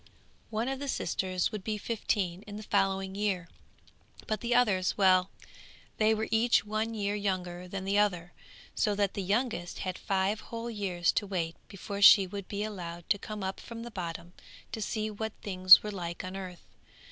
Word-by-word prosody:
One 225 +2 -1
of 270 0 -2
the 285 - -4
sisters 185 -8 -1
would 210 -4 -5
be 215 0 -2
fifteen 200 -4 -2
in 205 - -7
the 215 - -7
following 195 -2 0
year, 195 -3 -1 0.8
but 215 -2 -2
the 235 0 +1
others, 200 -7 +2
well, 185 -1 +4 0.7
they 220 0 +4
were 220 0 -2
each 225 -1 +3
one 215 +2 -2
year 205 -1 -1
younger 180 -3 -3
than 190 +1 -5
the 200 +1 +2
other, 180 -4 0 0.4
so 210 -2 +1
that 200 -1 +1
the 200 - -3
youngest 200 -2 -1
had 185 -1 -3
five 195 +1 0
whole 230 0 -6
years 185 -5 0
to 205 - -1
wait 170 -4 -2
before 200 +1 -6
she 200 0 +9
would 195 +1 -7
be 205 0 -3
allowed 175 -5 -6
to 200 - +3
come 210 0 -6
up 190 0 -3
from 230 -1 -8
the 240 - -8
bottom, 170 -3 -6 0.4
to 220 - -4
see 215 0 -2
what 220 +1 -4
things 185 -2 +8
were 210 - -4
like 170 -3 -5
on 185 +1 -6
earth. 185 -2 -8
200 Hz, 185 wpm, -30 LUFS, 185-215 Hz, 0.8 s, she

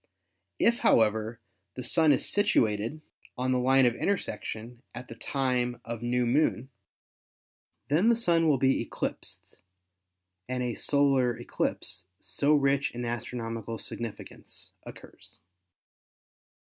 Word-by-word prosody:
If, 235 0 +3
however, 110 +1 +2 0.4
the 125 - -5
Sun 155 +5 +4
is 135 - +2
situated 115 - +1 0.4
on 130 +1 0
the 125 - +2
line 130 +1 +4
of 120 - +3
intersection 120 - -3
at 125 +1 -8
the - - -7
time 125 -1 -1
of 115 -1 -5
new 120 +1 0
moon, 130 0 +1 1.2
then 165 - +3
the 235 - +5
Sun 170 -8 +2
will 145 - +3
be 135 +1 +2
eclipsed, - - -6 0.9
and 125 0 -2
a 120 -1 -2
solar 135 -4 +2
eclipse 90 +2 -4
so 145 +2 +1
rich 140 -1 +2
in 120 0 -4
astronomical 115 -1 -4
significance 115 0 -8 0.2
occurs. - - -12
125 Hz, 120 wpm, -28 LUFS, 115-140 Hz, 1.2 s, the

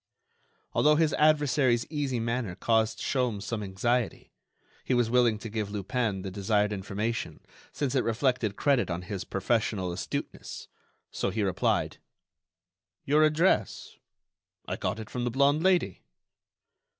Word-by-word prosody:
Although 150 0 +4
his 155 0 +2
adversary's 145 -5 +3
easy 140 -5 -1
manner 115 -4 -2
caused 110 +2 +1
Sholmes 125 -7 -1
some 110 0 -3
anxiety, 110 +5 -1 0.5
he 130 - 0
was 120 -2 +1
willing 120 -3 +4
to 110 - -7
give 110 -2 -3
Lupin 105 -1 -2
the 95 - -5
desired 105 +2 +1
information 105 +4 -3 0.3
since 140 -4 -2
it 130 - +2
reflected 115 -2 0
credit 140 -4 +2
on 85 +1 -3
his 100 0 -5
professional 100 -3 -1
astuteness; 85 - -5 0.4
so - - -1
he 110 - -1
replied: 95 -3 0 1.1
"Your 150 +2 +4
address? 155 - +1 0.7
I - - -2
got 90 +3 -2
it 110 - -7
from 125 - -3
the 120 - 0
blonde 140 +5 +3
Lady." 180 - +2
115 Hz, 135 wpm, -28 LUFS, 105-135 Hz, 1.1 s, Although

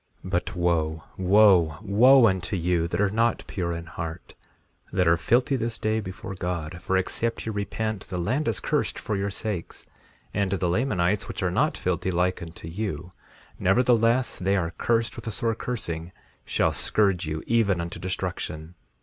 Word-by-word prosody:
3:3 - - -6
But, 90 -1 -1
wo, 80 -3 0 0.2
wo, 100 - +5
unto 95 0 -1
you 85 -1 +1
that 85 +2 -3
are 100 -1 +2
not 115 +2 +1
pure 90 -3 -3
in 85 0 -5
heart, 80 +1 -7 0.6
that 90 -2 +2
are 85 - +6
filthy 125 - +2
this 115 -2 -2
day 110 +1 0
before 95 -1 -6
God; 90 -2 -4
for 95 - +1
except 115 +5 -1
ye 110 - -2
repent 110 0 -3
the 90 - -4
land 125 - 0
is 110 - 0
cursed - - -1
for 110 - -3
your 100 +1 -1
sakes; 100 -3 -4 0.5
and 100 -2 0
the 95 -2 0
Lamanites, 95 -1 +1
which - - -4
are - - +1
not - - +1
filthy 90 0 -1
like 90 +1 0
unto 80 0 -8
you, 90 -2 -4 0.5
nevertheless 120 +4 +3
they 95 +2 +1
are 85 -3 -1
cursed 115 -1 0
with - - -8
a - - -1
sore 115 +2 0
cursing, 85 -9 -4 0.3
shall - - +1
scourge 95 -6 +1
you 80 0 -3
even 110 -6 +2
unto 85 0 -5
destruction. 90 -3 -4
95 Hz, 170 wpm, -26 LUFS, 85-110 Hz, 0.6 s, are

